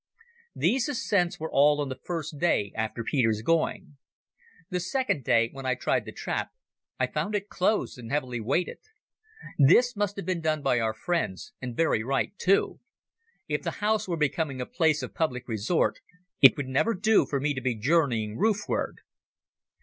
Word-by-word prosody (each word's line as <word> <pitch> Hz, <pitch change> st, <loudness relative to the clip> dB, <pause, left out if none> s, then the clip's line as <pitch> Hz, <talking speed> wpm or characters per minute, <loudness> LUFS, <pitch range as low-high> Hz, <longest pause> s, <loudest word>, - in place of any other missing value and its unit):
These 260 Hz, +3 st, +1 dB
ascents 200 Hz, -10 st, 0 dB
were 160 Hz, +1 st, -4 dB
all 145 Hz, +1 st, +4 dB
on 145 Hz, -2 st, -2 dB
the 130 Hz, 0 st, -6 dB
first 160 Hz, -4 st, -4 dB
day 120 Hz, -, +1 dB
after 110 Hz, +1 st, -3 dB
Peter's 115 Hz, -4 st, +1 dB
going. 155 Hz, -1 st, 0 dB, 0.7 s
The 180 Hz, -, 0 dB
second 195 Hz, -, -1 dB
day, 115 Hz, 0 st, +3 dB
when 135 Hz, -1 st, -6 dB
I 130 Hz, -, +2 dB
tried -, -, 0 dB
the -, -, -7 dB
trap, -, -, -3 dB, 0.5 s
I -, -, +3 dB
found 210 Hz, +1 st, -3 dB
it 205 Hz, 0 st, -3 dB
closed 190 Hz, -7 st, 0 dB
and 115 Hz, -1 st, -9 dB
heavily 130 Hz, -5 st, -1 dB
weighted. 135 Hz, +11 st, -1 dB, 0.8 s
This 230 Hz, -, +5 dB
must 205 Hz, -1 st, -1 dB
have 200 Hz, -, -6 dB
been 180 Hz, -2 st, -1 dB
done 155 Hz, -2 st, 0 dB
by 130 Hz, -3 st, +2 dB
our 110 Hz, -1 st, -1 dB
friends, 175 Hz, -, -2 dB
and 125 Hz, -2 st, -6 dB
very 160 Hz, -9 st, +2 dB
right, 135 Hz, -, -1 dB
too. 195 Hz, +2 st, +2 dB, 0.7 s
If -, -, -1 dB
the -, -, -4 dB
house 215 Hz, 0 st, +1 dB
were 170 Hz, -2 st, -2 dB
becoming 150 Hz, -2 st, -1 dB
a 125 Hz, -, -2 dB
place 155 Hz, -4 st, +1 dB
of 125 Hz, -, -6 dB
public 125 Hz, -6 st, -2 dB
resort, 115 Hz, -, 0 dB, 0.4 s
it 135 Hz, -, +8 dB
would 140 Hz, -2 st, -3 dB
never 170 Hz, +13 st, +1 dB
do 215 Hz, +3 st, +3 dB
for 140 Hz, -, -1 dB
me 145 Hz, +2 st, 0 dB
to 130 Hz, -, -4 dB
be 130 Hz, -3 st, -1 dB
journeying 115 Hz, -4 st, +1 dB
roof 210 Hz, 0 st, +2 dB
ward. -, -, -2 dB
150 Hz, 180 wpm, -27 LUFS, 125-180 Hz, 0.8 s, it